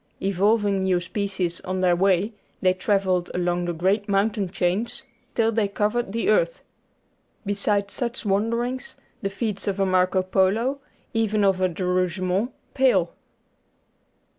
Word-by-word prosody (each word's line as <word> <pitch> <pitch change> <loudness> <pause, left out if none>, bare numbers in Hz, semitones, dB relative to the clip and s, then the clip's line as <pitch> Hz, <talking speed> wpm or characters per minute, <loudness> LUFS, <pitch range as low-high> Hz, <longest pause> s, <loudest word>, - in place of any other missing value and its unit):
Evolving 200 +1 +2
new 185 -2 +2
species 185 -1 -3
on 185 0 -3
their 180 -1 +4
way, 195 +3 +2 0.3
they 185 -1 +3
travelled 185 -1 +1
along 175 0 0
the 175 - -1
great 195 +5 0
mountain 200 0 +1
chains 185 +6 -1 0.3
till 225 -1 +3
they 220 -2 +1
covered 210 +2 -1
the 230 +2 -1
earth. - - +2 0.8
Beside 200 0 0
such 240 -1 -3
wanderings 230 +5 -1 0.2
the 195 - -1
feats 210 -1 -3
of 200 -1 -1
a 195 - +3
Marco 185 0 +2
Polo, 205 +9 +1 0.3
even 215 -2 +1
of 190 -2 +2
a 185 - +3
De 180 +2 -4
Rougemont, 185 +4 0 0.2
pale. 220 -11 +3
195 Hz, 140 wpm, -24 LUFS, 185-215 Hz, 0.8 s, their